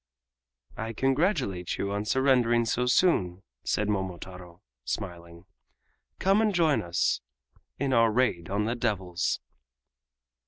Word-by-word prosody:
"I 115 +1 -4
congratulate 135 - 0
you 100 - -2
on 100 +1 -2
surrendering 120 -1 +3
so 125 +2 0
soon," 100 - +2 0.2
said 105 - 0
Momotaro, 90 -2 -5 0.2
smiling. 85 -3 -6 0.7
"Come 195 +3 +3
and 215 -3 +1
join 160 -5 +3
us 85 +1 0 0.6
in 135 -1 0
our 115 -1 +5
raid 110 -8 0
on 100 +2 0
the 115 - 0
devils." 95 -7 -1
105 Hz, 115 wpm, -28 LUFS, 90-130 Hz, 0.7 s, our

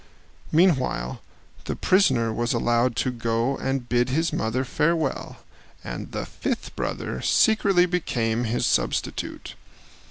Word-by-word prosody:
Meanwhile 145 - +2 0.4
the - - -3
prisoner 130 - +3
was 120 +1 -1
allowed 120 +1 +1
to 130 - 0
go 115 +2 -1
and 135 -2 -2
bid 120 +1 +1
his 160 +6 0
mother 120 +4 -1
farewell, 150 +2 -1 0.4
and - - -6
the - - -4
fifth - - -4
brother 65 - -3
secretly 200 -5 +4
became 120 -10 -1
his 115 +2 0
substitute. - - -1
125 Hz, 120 wpm, -24 LUFS, 115-160 Hz, 0.4 s, secretly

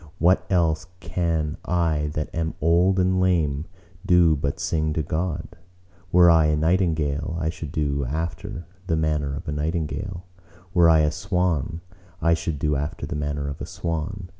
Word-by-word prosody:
What 90 +1 +3
else 80 -3 +1
can 80 -4 -1
I 80 -4 0
that 75 - -3
am 80 -1 -2
old 85 +4 +3
and 95 0 +2
lame 80 -5 +1 0.4
do 90 -4 +5
but 70 -1 -2
sing 80 -1 0
to 80 - -1
God? 80 +1 -2 0.6
Were 90 0 +7
I 80 -2 +6
a 75 0 +2
nightingale, 80 -2 0
I 80 -1 0
should 80 -3 -7
do 70 -3 -1
after 85 - -4 0.2
the 80 - +1
manner 75 -3 0
of - - -8
a - - -1
nightingale. 85 +4 -3 0.5
Were 85 -3 +6
I 80 -1 +6
a 75 -1 +2
swan, 90 -3 -1 0.4
I 85 +1 +3
should 80 -2 -2
do 75 +1 0
after 75 +3 -3
the - - -5
manner 75 -1 -2
of 70 0 -6
a - - -4
swan. 90 +3 -4
80 Hz, 165 wpm, -24 LUFS, 75-90 Hz, 0.6 s, Were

